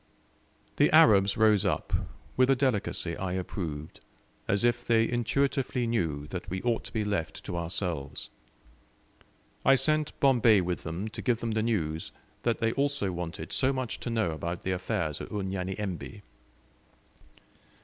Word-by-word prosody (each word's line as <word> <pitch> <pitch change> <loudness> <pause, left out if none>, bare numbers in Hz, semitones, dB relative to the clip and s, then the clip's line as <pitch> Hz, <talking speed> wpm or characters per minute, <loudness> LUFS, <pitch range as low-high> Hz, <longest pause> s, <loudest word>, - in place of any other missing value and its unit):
The - - +5
Arabs 100 0 +6
rose 110 -3 +5
up, - - -1 0.4
with 130 +1 +4
a 135 - +5
delicacy 110 -9 0
I 95 -1 -3
approved, 85 -5 -5 0.5
as 100 +3 +1
if 120 0 +2
they 115 -1 +3
intuitively 125 +1 0
knew 80 -11 -1
that 90 0 -6
we 95 +1 -2
ought 120 -2 0
to - - -8
be 110 - -1
left 100 -6 -3
to - - -4
ourselves. 85 -4 -3 1.3
I 135 - +6
sent 155 +2 +1
Bombay 120 -7 +5
with 90 0 -2
them 85 +6 -4
to 105 - -7
give 120 -3 +1
them 115 -1 -2
the 110 0 +1
news 80 -9 -1 0.3
they 115 -1 +1
also 140 -7 0
wanted 85 -2 -5
so 135 0 +3
much 130 -3 -3
to - - -4
know 110 -7 +1
about 85 +2 -4
the 95 - -2
affairs 85 -4 -2
at - - -7
Unyanyembe. 95 0 -4
105 Hz, 150 wpm, -29 LUFS, 90-120 Hz, 1.3 s, Arabs